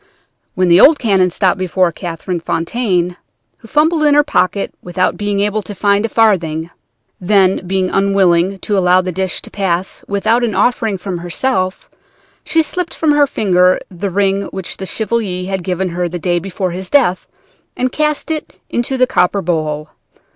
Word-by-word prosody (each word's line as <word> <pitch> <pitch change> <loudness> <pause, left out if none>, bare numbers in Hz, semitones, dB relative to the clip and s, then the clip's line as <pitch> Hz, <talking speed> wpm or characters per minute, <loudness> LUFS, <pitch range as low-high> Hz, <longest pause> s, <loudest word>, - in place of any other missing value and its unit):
"Then 185 0 +2
the 175 +3 +6
old 310 0 +7
canon 195 -7 +2
stopped 185 +1 0
before 185 -1 +1
Catherine 170 +1 -5
Fontaine, 180 0 -1 0.4
who - - -15
fumbled 310 +5 +2
in 290 -1 +4
her 295 - +5
pocket 195 -7 0
without 180 +1 -1
being 205 -1 -1
able 210 +1 0
to 205 0 -9
find 200 +2 +1
a - - -15
farthing. 170 -8 +1 0.5
Then, 190 -1 +2
being 185 0 0
unwilling 195 -2 +2
to 210 - -1
allow 180 -1 +4
the 185 0 -4
dish 185 0 -3
to - - -11
pass 190 -2 -2
without 220 +4 +1
an 225 -4 -1
offering 225 -5 +1
from 180 -1 -5
herself, 185 +2 -2 0.6
she 325 -1 +2
slipped 355 +2 -4
from 315 -2 +1
her 290 -1 +4
finger 185 -6 +2
the 190 +2 -4
ring 195 +1 +1
which 190 -2 -6
the 190 - -6
Chevalier 205 -5 -2
had 190 -2 -3
given 185 0 -2
her 175 0 -2
the 175 - -4
day 175 0 0
before 185 0 -3
his 185 +1 -6
death, 215 -11 +2 0.5
and 255 0 0
cast 300 +2 -1
it 310 -1 -5
into 240 +3 -1
the 255 - +4
copper 200 -5 +1
bowl. 155 -3 -2
190 Hz, 175 wpm, -16 LUFS, 180-220 Hz, 0.6 s, old